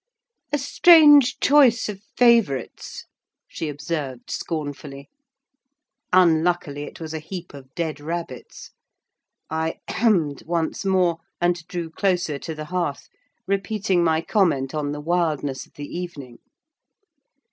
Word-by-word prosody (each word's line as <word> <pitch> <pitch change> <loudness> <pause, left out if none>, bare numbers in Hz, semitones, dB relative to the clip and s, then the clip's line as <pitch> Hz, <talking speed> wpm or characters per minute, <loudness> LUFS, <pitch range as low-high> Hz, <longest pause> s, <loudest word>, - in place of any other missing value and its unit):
"A 295 - +1
strange 290 -2 +6
choice 265 -5 +4
of 200 -2 -7 0.2
favourites!" 230 - +1 0.4
she 160 - -5
observed 145 -3 -5
scornfully. 145 -3 -5 1.0
Unluckily, 170 -4 +2
it - - -11
was 160 -1 -6
a 160 - -3
heap 175 +2 -8
of 135 -2 -13
dead 160 -3 -3
rabbits. 160 -4 -7 0.8
I 160 0 -1
hemmed 180 - +1
once 165 +1 -2
more, 185 -4 +1 0.2
and 175 -1 0
drew 170 -3 -5
closer 180 -5 0
to 160 +2 -6
the 155 0 -6
hearth, 170 -4 -3 0.4
repeating 195 -2 0
my 160 -1 +2
comment 165 -10 +1
on 150 -2 -2
the 145 0 -5
wildness 155 -5 -1
of - - -32
the 145 - -7
evening. 145 -9 -7
165 Hz, 120 wpm, -23 LUFS, 145-190 Hz, 1.0 s, strange